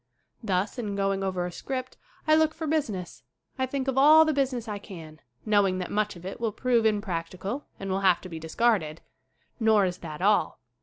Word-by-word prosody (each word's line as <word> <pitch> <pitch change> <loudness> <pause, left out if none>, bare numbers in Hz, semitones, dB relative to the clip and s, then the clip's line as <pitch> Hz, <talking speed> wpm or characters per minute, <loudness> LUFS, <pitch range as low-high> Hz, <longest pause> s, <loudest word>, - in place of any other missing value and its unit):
Thus 200 +1 -1
in 210 -4 -3
going 195 -1 0
over 185 -2 -1
a 180 - -4
script 255 +7 -5 0.3
I 310 - +4
look 315 0 +3
for 320 0 -5
busi 310 -4 0
ness. 185 -4 -7 0.4
I 260 - +1
think 270 0 -3
of 265 0 +1
all 310 +3 +8
the 310 - +1
business 260 -4 -1
I 205 -1 -4
can, 160 -6 -11 0.3
knowing 205 -3 +3
that 180 -1 -4
much 210 -1 0
of 175 0 -12
it 195 +5 -7
will 225 -2 0
prove 235 0 +2
impracticable 195 +4 -3
and 195 -1 -4
will 190 - 0
have 185 -3 +4
to 185 - -9
be 165 -2 -6
discarded. 165 -1 0 0.6
Nor 220 -3 +4
is 180 -1 -3
that 155 -3 -8
all. 205 +3 +2
205 Hz, 205 wpm, -27 LUFS, 185-255 Hz, 0.6 s, all